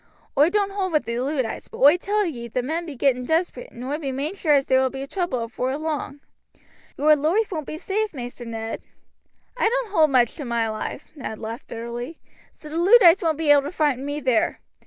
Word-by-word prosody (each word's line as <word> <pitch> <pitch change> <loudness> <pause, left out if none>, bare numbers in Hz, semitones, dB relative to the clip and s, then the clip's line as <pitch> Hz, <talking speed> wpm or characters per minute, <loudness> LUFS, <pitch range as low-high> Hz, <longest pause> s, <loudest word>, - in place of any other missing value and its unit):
Oi 295 +4 +5
don't 400 +1 +1
hold 385 -3 -2
with 305 - +2
the 235 +1 -2
Luddites, 260 -2 -2
but - - -11
oi 285 +4 +7
tell 410 +3 0
ye 240 -9 -5
the 245 +2 -2
men 330 +6 -3
be 300 - -7
getting 250 -1 +1
desperate, 345 - -1
and 240 - -9
oi 285 +4 -3
be 275 -4 -3
main 280 +6 -3
sure 320 -7 +2
as 275 -1 +2
there 260 0 +3
will 260 - +2
be 270 +1 -6
trouble 310 -7 -2
afore 255 +4 -3
long. 300 -2 -4 0.8
Your 305 +1 +5
loife 340 +10 +1
won't 310 -5 -4
be 310 - -5
safe, 420 +5 -2
Maister 245 -3 -7
Ned." 225 -1 -5 0.7
"I 465 -3 +2
don't - - -2
hold 320 -6 +4
much 250 -4 +3
to 300 - -5
my 235 -3 0
life," 215 0 -5
Ned 235 -6 -6
laughed 225 +2 -7
bitterly, 235 +6 -6 0.4
"so 305 - -12
the 315 - -4
Luddites 375 0 +7
won't 320 -4 +1
be 315 -2 +3
able 290 -1 +7
to 285 +3 -5
frighten 290 -7 0
me 290 +1 -3
there." 255 -5 +1
290 Hz, 220 wpm, -23 LUFS, 250-340 Hz, 0.8 s, oi